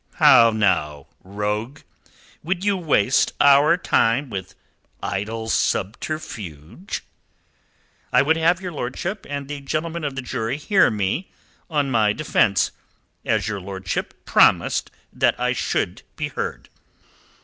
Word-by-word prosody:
"How 130 Hz, -7 st, +7 dB
now, 85 Hz, -10 st, 0 dB, 0.2 s
rogue? 105 Hz, +7 st, -3 dB, 0.6 s
Would 180 Hz, +4 st, -2 dB
you 205 Hz, -1 st, +3 dB
waste 145 Hz, -, +2 dB
our 145 Hz, +4 st, +6 dB
time 125 Hz, -5 st, +1 dB
with 95 Hz, -2 st, -6 dB, 0.5 s
idle 110 Hz, +3 st, -3 dB
subterfuge?" 110 Hz, -, -3 dB, 1.1 s
"I 125 Hz, +2 st, +5 dB
would 160 Hz, +3 st, +3 dB
have 165 Hz, +2 st, +2 dB
your 185 Hz, -2 st, -5 dB
lordship 170 Hz, -, -4 dB
and 140 Hz, -1 st, -4 dB
the 145 Hz, 0 st, -6 dB
gentlemen 160 Hz, +4 st, -3 dB
of 140 Hz, -2 st, -3 dB
the 135 Hz, -, -4 dB
jury 115 Hz, +1 st, -3 dB
hear 190 Hz, +7 st, +3 dB
me 105 Hz, -, -2 dB, 0.4 s
on 145 Hz, -4 st, 0 dB
my 110 Hz, -3 st, +3 dB
defence, 110 Hz, -9 st, +1 dB, 0.5 s
as -, -, +1 dB
your 100 Hz, -2 st, -3 dB
lordship 95 Hz, -1 st, -5 dB
promised -, -, +3 dB, 0.2 s
that -, -, +1 dB
I -, -, +1 dB
should -, -, -2 dB
be -, -, -3 dB
heard." -, -, -5 dB
130 Hz, 125 wpm, -22 LUFS, 105-155 Hz, 1.1 s, How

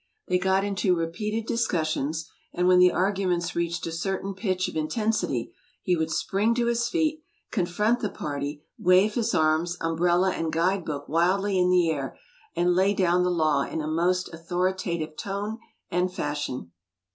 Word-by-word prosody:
They 180 Hz, -, +2 dB
got 190 Hz, +1 st, +2 dB
into 200 Hz, -2 st, +1 dB
repeated 210 Hz, +7 st, -2 dB
discussions, 160 Hz, -8 st, -1 dB, 0.3 s
and 180 Hz, 0 st, +1 dB
when 180 Hz, 0 st, +6 dB
the 180 Hz, 0 st, +7 dB
arguments 180 Hz, -3 st, 0 dB
reached 170 Hz, 0 st, -1 dB
a 165 Hz, -, -3 dB
certain 190 Hz, +4 st, -3 dB
pitch 185 Hz, -2 st, -1 dB
of -, -, -7 dB
intensity, 215 Hz, +8 st, -1 dB, 0.3 s
he 180 Hz, -, +2 dB
would 160 Hz, -1 st, -1 dB
spring 205 Hz, +7 st, +1 dB
to 240 Hz, -1 st, +1 dB
his 235 Hz, 0 st, +1 dB
feet, 315 Hz, -2 st, 0 dB, 0.3 s
confront 210 Hz, +5 st, +1 dB
the 210 Hz, -, -2 dB
party, 145 Hz, -1 st, -5 dB, 0.2 s
wave 185 Hz, +4 st, +4 dB
his 230 Hz, -1 st, 0 dB
arms, 160 Hz, +3 st, +2 dB
umbrella, 175 Hz, +3 st, +2 dB
and 165 Hz, -1 st, -2 dB
guide 175 Hz, +3 st, +1 dB
book 145 Hz, -2 st, -4 dB
wildly 185 Hz, +4 st, +2 dB
in 180 Hz, 0 st, +3 dB
the 175 Hz, -2 st, +4 dB
air, 140 Hz, -3 st, -4 dB, 0.4 s
and 175 Hz, +1 st, +2 dB
lay 190 Hz, +3 st, +3 dB
down 180 Hz, -1 st, +3 dB
the 180 Hz, -, +2 dB
law 155 Hz, -5 st, +2 dB
in 160 Hz, -, -3 dB
a 155 Hz, -, -3 dB
most 175 Hz, +3 st, 0 dB
authoritative 170 Hz, -1 st, -2 dB
tone 205 Hz, +3 st, -4 dB, 0.3 s
and 180 Hz, +1 st, +1 dB
fashion. 145 Hz, -, -4 dB
180 Hz, 165 wpm, -26 LUFS, 165-195 Hz, 0.4 s, the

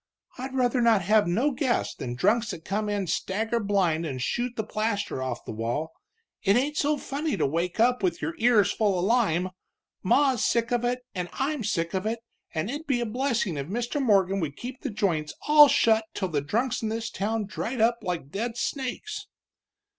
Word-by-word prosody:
"I'd 260 Hz, +1 st, -5 dB
rather 250 Hz, -1 st, +2 dB
not 225 Hz, -5 st, +4 dB
have 210 Hz, +2 st, +4 dB
no 235 Hz, +12 st, +2 dB
guests 255 Hz, -2 st, 0 dB
than 120 Hz, -1 st, -5 dB
drunks 215 Hz, -, +2 dB
that 165 Hz, -6 st, -6 dB
come 210 Hz, +2 st, -1 dB
in 205 Hz, -2 st, -1 dB
stagger 220 Hz, +7 st, -1 dB
blind 190 Hz, -6 st, +1 dB
and 135 Hz, -6 st, -4 dB
shoot 240 Hz, -, -1 dB
the 220 Hz, -, -2 dB
plaster 215 Hz, -8 st, -2 dB
off 130 Hz, -2 st, -3 dB
of -, -, -32 dB
the -, -, -5 dB
wall. 120 Hz, +9 st, -2 dB, 0.5 s
It 195 Hz, 0 st, +3 dB
ain't 280 Hz, +5 st, +1 dB
so 300 Hz, 0 st, +1 dB
funny 290 Hz, +3 st, -3 dB
to -, -, +1 dB
wake 170 Hz, +7 st, -1 dB
up 245 Hz, +1 st, +3 dB
with 175 Hz, -3 st, 0 dB
your 160 Hz, +3 st, -3 dB
ears 225 Hz, -4 st, +4 dB
full 205 Hz, -4 st, +1 dB
of 175 Hz, -, 0 dB
lime! 190 Hz, -6 st, +2 dB, 0.5 s
Ma's 270 Hz, -5 st, +3 dB
sick 235 Hz, 0 st, +1 dB
of 240 Hz, -1 st, +1 dB
it, 250 Hz, +1 st, -1 dB
and 180 Hz, -2 st, -3 dB
I'm 275 Hz, -1 st, -1 dB
sick 170 Hz, -5 st, -1 dB
of 190 Hz, +2 st, -1 dB
it, 225 Hz, +1 st, -2 dB, 0.3 s
and 160 Hz, +3 st, -2 dB
it'd 295 Hz, +3 st, -6 dB
be 265 Hz, -4 st, +1 dB
a 240 Hz, -, -1 dB
blessin' 230 Hz, -, -1 dB
if 140 Hz, 0 st, -4 dB
Mr. 240 Hz, -, -2 dB
Morgan 195 Hz, -5 st, +3 dB
would 150 Hz, -5 st, -3 dB
keep 250 Hz, +1 st, -7 dB
the 280 Hz, -, -3 dB
joints 170 Hz, -8 st, -1 dB
all 295 Hz, 0 st, +9 dB
shut 220 Hz, -4 st, +3 dB
till 190 Hz, -2 st, -1 dB
the 150 Hz, -3 st, 0 dB
drunks 230 Hz, -, -1 dB
in 220 Hz, -, -1 dB
this 225 Hz, +1 st, -3 dB
town 215 Hz, +2 st, -1 dB
dried 225 Hz, +5 st, -4 dB
up 230 Hz, +2 st, +3 dB
like 165 Hz, -6 st, -4 dB
dead 230 Hz, +5 st, -3 dB
snakes!" 270 Hz, -, -3 dB
220 Hz, 205 wpm, -26 LUFS, 180-245 Hz, 0.5 s, all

